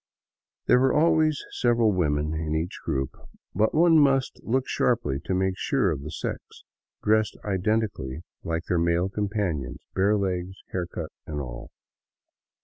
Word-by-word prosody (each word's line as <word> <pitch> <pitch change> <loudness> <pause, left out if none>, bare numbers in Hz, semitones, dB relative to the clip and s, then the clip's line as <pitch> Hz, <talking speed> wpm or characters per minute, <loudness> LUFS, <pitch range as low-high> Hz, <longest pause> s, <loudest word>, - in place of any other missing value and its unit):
There 125 - +5
were 130 0 +3
always 155 -1 +3
several 120 -2 +3
women 75 -4 0
in 80 0 -2
each 80 +3 -2
group, 65 -1 -1 0.4
but 110 - +1
one 165 0 +6
must 135 -2 +2
look 130 +3 0
sharply 75 - +1
to 95 - 0
make 95 0 +1
sure 125 - +1
of 70 -4 -3
the 75 - -6
sex, 75 - -4 0.6
dressed 110 0 +2
identically 95 -8 -1 0.2
like 85 0 -2
their 85 0 0
male 85 +2 +2
companions, 100 - -2 0.2
bare 100 +3 +3
legs, 95 -1 -2 0.2
hair 90 -2 -2
cut, 85 -3 -6 0.2
and 75 -2 -4
all. - - -7
95 Hz, 145 wpm, -26 LUFS, 80-110 Hz, 0.6 s, one